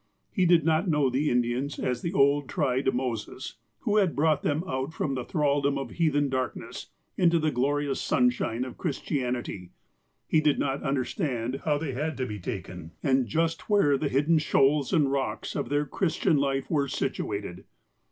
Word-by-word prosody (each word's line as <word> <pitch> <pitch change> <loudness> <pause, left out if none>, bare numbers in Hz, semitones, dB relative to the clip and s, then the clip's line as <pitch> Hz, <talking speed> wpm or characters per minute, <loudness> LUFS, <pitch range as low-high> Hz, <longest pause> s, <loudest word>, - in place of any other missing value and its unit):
He 185 -4 +2
did 170 -3 +4
not 165 +3 +2
know 150 -5 +2
the 140 +4 +1
Indians 125 +3 0
as 125 -1 -2
the 170 - -2
old 140 -4 +3
tried 135 -6 +1
Moses, 125 -1 -4 0.2
who 210 - +1
had 190 -6 +2
brought 150 0 +2
them 150 +3 0
out 130 +3 -3
from 140 - -1
the 130 -2 -3
thraldom 145 -2 +1
of 135 - -5
heathen 145 -4 +1
darkness, 130 -2 -4 0.3
into 170 -2 +4
the 155 -1 +1
glorious 140 +2 0
sunshine 125 -1 +1
of 130 - -9
Christianity. 125 - -3 0.6
He 155 - +3
did 150 -2 +3
not 135 0 -1
understand 130 - -2
how 150 -2 +2
they 150 -2 -3
had 150 +5 -3
to 130 - -1
be 105 -3 -6
taken, 90 -4 -6
and 130 -3 +2
just 165 - -1
where 200 -9 +4
the 140 +1 -1
hidden 150 +5 +3
shoals 140 -1 +2
and 150 -6 +3
rocks 135 -1 -2
of - - -2
their 145 +1 +1
Christian 160 0 +1
life 135 -1 0
were 145 -3 +1
situated. - - -3
140 Hz, 170 wpm, -27 LUFS, 130-155 Hz, 0.6 s, did